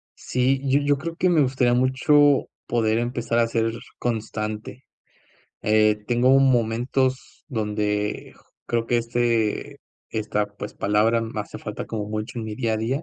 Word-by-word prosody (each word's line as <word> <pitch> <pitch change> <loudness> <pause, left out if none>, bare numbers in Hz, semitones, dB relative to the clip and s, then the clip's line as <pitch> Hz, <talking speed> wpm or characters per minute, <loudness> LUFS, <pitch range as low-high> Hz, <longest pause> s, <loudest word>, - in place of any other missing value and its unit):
Sí, 130 +2 0
yo 135 +2 +4
yo 145 0 +2
creo 165 +4 -5
que 185 +2 +2
me 165 -3 +4
gustaría 130 -2 +2
mucho 135 +3 +4 0.2
poder 110 -2 +1
empezar 120 -1 -1
a 115 - +3
ser 115 0 0 0.3
constante, 110 +1 -4 0.8
eh, 110 0 +4
tengo 125 +2 +4
momentos 130 +1 0
donde 105 -3 -2 0.3
creo 115 -1 -1
que, 120 - +2
este 115 -2 0 0.3
esta, 105 -1 -1
pues, 105 0 -8
palabra 110 +3 +2
me 110 -1 -4
hace 105 - -8
falta - - -6
como 105 -2 -4
mucho 110 +3 -4
en 115 - -4
mi 110 -1 -5
día 115 -2 -1
a - - 0
día 125 +7 -2
115 Hz, 150 wpm, -24 LUFS, 110-130 Hz, 0.8 s, yo